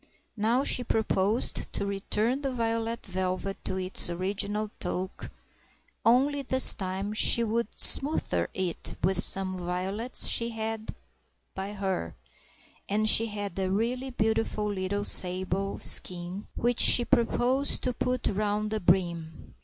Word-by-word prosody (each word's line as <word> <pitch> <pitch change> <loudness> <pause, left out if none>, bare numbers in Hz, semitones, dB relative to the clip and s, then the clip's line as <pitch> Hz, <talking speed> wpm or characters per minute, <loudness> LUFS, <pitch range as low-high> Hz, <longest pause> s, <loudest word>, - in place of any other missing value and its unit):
Now 230 +5 0
she 250 - 0
proposed 220 -1 -1
to - - -3
return 210 +6 -2
the 275 -2 -3
violet 230 -1 -3
velvet 185 +1 -4
to 190 - -3
its 185 -1 -2
original 200 +4 -3
toque, 185 +1 -5 0.7
only 275 +5 +2
this 260 -1 +7
time 195 0 -5
she 235 +2 +4
would 230 +1 -2
smother 180 - +2
it 185 -3 -3
with 185 +1 +1
some 190 -1 +3
violets 185 +7 -2
she 230 0 0
had 220 -1 -6 0.6
by 195 +2 -6
her, 190 - -4 0.7
and 215 +2 0
she 225 +1 +6
had 205 -3 -5
a 190 -1 -2
really 240 +7 -2
beautiful 220 -2 -2
little 205 0 -3
sable 185 +1 +1
skin 180 +3 +3
which 240 0 -1
she 240 - +9
proposed 250 +4 0
to 250 - -2
put 250 0 -3
round 210 +1 -2
the 215 - -2
brim. 170 -3 -2
205 Hz, 130 wpm, -27 LUFS, 190-230 Hz, 0.7 s, she